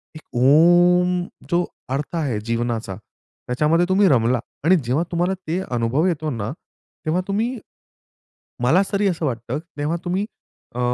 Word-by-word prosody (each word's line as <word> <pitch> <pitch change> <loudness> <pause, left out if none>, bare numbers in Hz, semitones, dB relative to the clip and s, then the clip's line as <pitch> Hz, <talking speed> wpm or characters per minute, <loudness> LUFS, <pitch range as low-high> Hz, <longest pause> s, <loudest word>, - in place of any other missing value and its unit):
एक 155 - -9 0.2
ओम 175 +5 +5 0.3
जो 175 0 +2 0.3
अर्थ 145 +5 -3
आहे 140 -10 -1
जीवनाचा 115 -4 -2 0.5
त्याच्यामध्ये 155 +7 +2
तुम्ही 195 +1 +4
रमला 120 -1 +3 0.2
आणि 175 +5 +5
जेव्हा 135 +7 +1
तुम्हाला 175 +2 +1
ते 170 +4 0 0.2
अनुभव 120 +7 +1
येतो 155 -3 -1
ना 110 -3 -3 0.5
तेव्हा 165 +4 +1
तुम्ही 225 +5 -1 1.1
मला 160 +10 +5
तरी 200 0 +2
असं 170 -3 -1
वाटतं 120 +1 -3 0.2
तेव्हा 150 +4 -1
तुम्ही 185 +3 0 0.5
अ, - - -4
160 Hz, 135 wpm, -22 LUFS, 125-180 Hz, 1.1 s, ओम